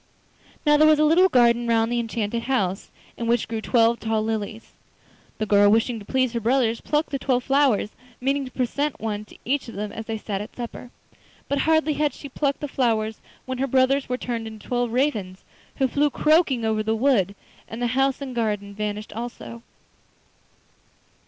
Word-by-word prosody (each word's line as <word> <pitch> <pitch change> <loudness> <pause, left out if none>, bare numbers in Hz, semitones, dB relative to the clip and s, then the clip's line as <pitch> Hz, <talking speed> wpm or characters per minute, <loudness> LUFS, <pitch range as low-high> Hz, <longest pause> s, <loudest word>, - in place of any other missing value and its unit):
Now 295 0 +5
there 310 +1 +6
was 310 -1 +6
a 305 - +3
little 355 +5 +5
garden 240 -4 +3
round 225 0 +2
the 240 - +1
enchanted 230 -1 -2
house, 195 -7 0 0.3
in 230 - -3
which 235 -1 +1
grew 225 -1 -3
twelve 235 0 +3
tall 220 -1 -1
lilies. 220 0 -4 0.7
The 215 - -1
girl, 205 0 +5
wishing 225 +2 +2
to 205 - -12
please 255 +1 0
her 235 - -1
brothers, 235 0 +1
plucked 300 +1 -1
the 275 - -2
twelve 255 -2 0
flowers, 270 -7 +2 0.3
meaning 275 +2 0
to - - -7
present 280 +4 -2
one 210 -1 -3
to - - -16
each 275 +2 0
of 230 - -9
them 210 +1 -4
as 225 - -7
they 225 -1 -2
sat 205 -2 -4
at 210 - -9
supper. 240 0 -7 0.6
But 280 - 0
hardly 315 -1 +3
had 300 0 0
she 285 - -9
plucked 280 +1 -1
the 295 - -2
flowers 225 -5 0 0.2
when 260 -1 -4
her 270 - +1
brothers 265 +1 +2
were 250 - -1
turned 235 -3 -4
into 220 -1 -11
twelve 245 -1 0
ravens, 220 -8 -1 0.3
who 270 - +2
flew 290 +3 +1
croaking 300 -5 +2
over 220 -1 +1
the 220 +1 0
wood, 220 -6 +2 0.3
and 225 - -7
the 245 - 0
house 270 +1 +1
and 265 -2 -5
garden 210 -4 -2
vanished 210 0 -4
also. 125 - -7
235 Hz, 190 wpm, -24 LUFS, 220-270 Hz, 0.7 s, there